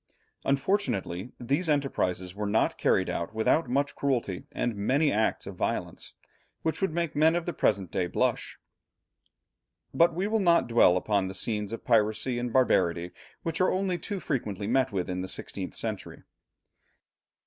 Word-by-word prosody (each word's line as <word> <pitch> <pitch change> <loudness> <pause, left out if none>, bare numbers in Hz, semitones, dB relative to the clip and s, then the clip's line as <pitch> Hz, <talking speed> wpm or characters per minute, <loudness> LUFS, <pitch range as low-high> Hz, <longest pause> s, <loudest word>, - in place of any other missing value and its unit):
Unfortunately 130 - 0
these 140 +8 0
enterprises 95 -11 0
were 105 +1 -3
not 110 +2 +2
carried 95 - +2
out 85 +6 -3
without 120 +5 +2
much 140 +3 +1
cruelty 120 -9 -1
and 120 -3 -2
many 135 +9 +2
acts 110 +1 0
of - - -6
violence - - -3 0.5
which 160 +3 -1
would 195 - +1
make 170 -1 -2
men 160 +3 +4
of 175 -1 -1
the 175 - -2
present 95 -5 +1
day 90 - 0
blush. - - -1 1.4
But 170 0 +4
we 185 +3 0
will 220 +2 +1
not 170 -4 +4
dwell 115 -6 +5
upon 100 0 0
the 95 - -6
scenes 105 +1 -1
of 115 - -6
piracy 115 +2 +2
and 120 0 -3
barbarity 90 -9 +2 0.3
which 165 +2 -2
are 185 - +4
only 185 -2 0
too 205 -3 -4
frequently 105 - -3
met 130 +3 +2
with 95 -3 -2
in 90 0 -3
the 95 - -4
sixteenth - - -4
century. - - -5
120 Hz, 160 wpm, -28 LUFS, 100-160 Hz, 1.4 s, dwell